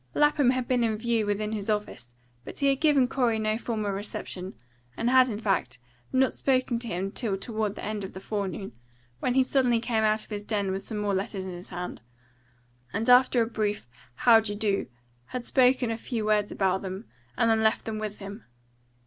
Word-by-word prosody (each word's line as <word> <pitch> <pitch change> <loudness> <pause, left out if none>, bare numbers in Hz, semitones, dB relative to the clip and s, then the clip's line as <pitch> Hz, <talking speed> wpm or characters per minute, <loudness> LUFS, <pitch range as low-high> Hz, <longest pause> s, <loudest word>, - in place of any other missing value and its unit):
Lapham 295 -3 +4
had 255 -1 0
been 250 -2 +2
in 220 -2 +1
view 225 -1 0
within 210 +1 -1
his 210 -1 -4
own 215 - +5
office, 120 - -13 0.3
but - - -9
he 280 - 0
had 270 -1 0
given 290 -5 +4
Corey 245 -4 +1
no 215 0 0
formal 220 -3 -2
reception, 195 -2 -6 0.4
and 240 +2 +1
had, 255 -1 +6
in 210 - -3
fact, 200 - -1 0.3
not 260 0 +3
spoken 255 -3 +1
to 235 - -6
him 190 -1 -2
till 210 -4 -1
toward 215 0 -2
the - - -8
end 210 -1 -3
of 190 - -7
the 190 - -7
forenoon, 195 -1 -4 0.5
when 245 - 0
he 265 - +5
suddenly 255 -3 +2
came 225 -1 0
out 215 0 +2
of - - -19
his 205 0 -4
den 205 -2 -1
with 190 +1 -2
some 215 +2 -6
more 205 -1 0
letters 195 0 -2
in 185 - -5
his 175 +1 -10
hand, 180 -7 -6 0.9
and 225 +4 +1
after 250 -1 +6
a - - -1
brief 210 - -2 0.3
"How 230 - +6
d'ye 210 -2 -2
do?" 205 -2 0 0.4
had 245 - -5
spoken 255 -2 +3
a 225 - -2
few 225 -1 -3
words 210 -1 +2
about 190 -1 +1
them, 190 +3 -6 0.3
and 225 -1 +3
left 220 0 +2
them 220 -1 -3
with 215 -1 -4
him. 200 +2 -9
215 Hz, 210 wpm, -27 LUFS, 200-240 Hz, 0.9 s, had